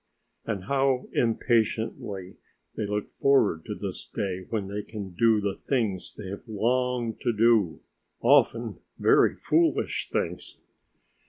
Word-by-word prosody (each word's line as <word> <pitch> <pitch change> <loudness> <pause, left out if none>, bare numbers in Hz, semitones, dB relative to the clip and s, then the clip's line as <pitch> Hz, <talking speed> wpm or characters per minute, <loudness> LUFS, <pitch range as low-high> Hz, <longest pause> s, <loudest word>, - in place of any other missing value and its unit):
And 100 -5 -3
how 135 +2 +1
impatiently 110 -4 0 0.4
they 110 - -2
look 105 0 -2
forward 135 -12 +2
to - - -4
this - - -5
day 95 -2 -4
when 105 -4 -2
they 100 +1 -3
can 105 -2 -7
do 110 +4 +3
the 100 -1 -1
things 110 -9 -2
they 105 - -8
have 100 +4 -8
longed 120 +1 0
to 120 - +1
do,... 110 -6 +3 0.4
often - - +3 0.2
very - - +4
foolish 330 0 +1
things. - - -3
110 Hz, 130 wpm, -27 LUFS, 100-120 Hz, 0.4 s, very